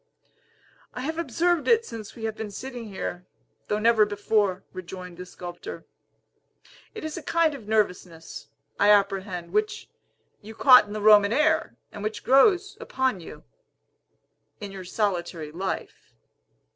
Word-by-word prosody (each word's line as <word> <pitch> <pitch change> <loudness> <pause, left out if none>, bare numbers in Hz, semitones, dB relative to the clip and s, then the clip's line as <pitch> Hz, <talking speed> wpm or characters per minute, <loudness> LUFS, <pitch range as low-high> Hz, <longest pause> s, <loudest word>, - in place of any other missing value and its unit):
"I 250 - -4
have 320 +5 -3
observed 335 +3 0
it 460 -1 +4
since 220 -3 -9
we 225 - -10
have 220 -1 -2
been 220 -1 -6
sitting 245 +3 -7
here, 180 -2 -6 0.4
though 210 - 0
never 225 0 +4
before," 205 -2 0
rejoined 180 -1 -9
the 180 0 -8
sculptor. 175 -1 -9 1.1
"It 435 - -7
is 315 +2 -5
a - - -5
kind 325 +1 +1
of 245 -7 -10
nervousness, 180 -6 -2 0.3
I 205 - +4
apprehend, 195 -4 +1
which, 210 0 -1 0.5
you 220 +1 -11
caught 250 -3 +7
in 205 - -8
the 215 - -4
Roman 205 -1 +6
air, 310 +5 +1 0.2
and 205 - -9
which 215 +1 -4
grows 375 - +4
upon 260 -6 -1
you, 165 - -11 1.2
in 205 -1 -7
your 190 -2 -9
solitary 175 -5 -2
life. 190 +4 -6
210 Hz, 145 wpm, -25 LUFS, 190-260 Hz, 1.2 s, caught